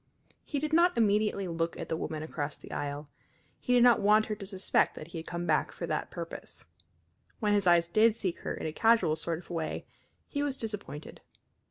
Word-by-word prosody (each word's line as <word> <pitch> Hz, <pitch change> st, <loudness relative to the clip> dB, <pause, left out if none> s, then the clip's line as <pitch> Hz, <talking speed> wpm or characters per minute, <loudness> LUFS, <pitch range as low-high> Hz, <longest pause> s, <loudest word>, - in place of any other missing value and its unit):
He 290 Hz, -, -3 dB
did 305 Hz, +2 st, -2 dB
not 345 Hz, 0 st, +4 dB
immediately 210 Hz, -3 st, +2 dB
look 165 Hz, 0 st, -2 dB
at -, -, -5 dB
the 160 Hz, -, -1 dB
woman 155 Hz, -1 st, -4 dB
across 150 Hz, -2 st, -4 dB
the -, -, -13 dB
aisle. 145 Hz, +1 st, -4 dB, 0.5 s
He 250 Hz, -, -3 dB
did 245 Hz, -1 st, +6 dB
not 245 Hz, -1 st, +6 dB
want 215 Hz, +2 st, +5 dB
her 215 Hz, -, -3 dB
to 200 Hz, -2 st, -8 dB
suspect 190 Hz, -1 st, +1 dB
that 155 Hz, -, -9 dB
he 170 Hz, -, -6 dB
had 160 Hz, -, -9 dB
come 175 Hz, 0 st, -3 dB
back 155 Hz, -3 st, +1 dB
for -, -, -5 dB
that -, -, -2 dB
purpose. -, -, -8 dB, 0.7 s
When 210 Hz, -2 st, +2 dB
his 200 Hz, -2 st, +2 dB
eyes 170 Hz, -1 st, +5 dB
did 215 Hz, +5 st, +4 dB
seek 190 Hz, -6 st, -3 dB
her -, -, -4 dB
in -, -, -6 dB
a 155 Hz, -, -2 dB
casual 225 Hz, -6 st, +4 dB
sort 165 Hz, +1 st, -2 dB
of 175 Hz, -, -12 dB
way 165 Hz, -2 st, -3 dB, 0.4 s
he 285 Hz, -, -2 dB
was 285 Hz, -2 st, -1 dB
disappointed. 205 Hz, -, -5 dB
195 Hz, 210 wpm, -30 LUFS, 165-225 Hz, 0.7 s, did